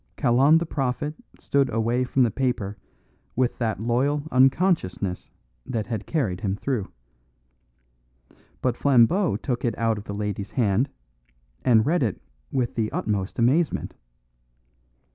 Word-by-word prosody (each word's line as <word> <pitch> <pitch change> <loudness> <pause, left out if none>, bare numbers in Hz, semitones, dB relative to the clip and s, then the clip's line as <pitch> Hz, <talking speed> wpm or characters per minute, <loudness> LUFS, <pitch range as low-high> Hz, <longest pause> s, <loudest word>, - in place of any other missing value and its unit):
Kalon 135 +6 +4
the 170 - -1
prophet 145 0 -2 0.2
stood 140 -2 +1
away 115 +3 +1
from 130 +1 +2
the 115 - +2
paper 120 -6 -1 0.6
with 125 -1 0
that 110 -5 -1
loyal 130 +6 +1
unconsciousness 130 - +1 0.3
that 110 - -3
had 115 -3 -5
carried 105 - -1
him 95 -1 -1
through. 115 -2 -3 1.7
But 125 -2 +1
Flambeau 140 - +3
took 125 -4 -3
it 120 - -1
out 115 -2 +1
of 105 - -11
the 100 - -5
lady's 105 -1 -3
hand, 120 +2 +1 0.7
and 110 -3 +4
read 165 +3 +2
it 110 -8 -1 0.3
with 125 -3 -1
the 110 -2 -1
utmost 100 -2 -2
amazement. 135 +8 +1
120 Hz, 130 wpm, -25 LUFS, 110-135 Hz, 1.7 s, Kalon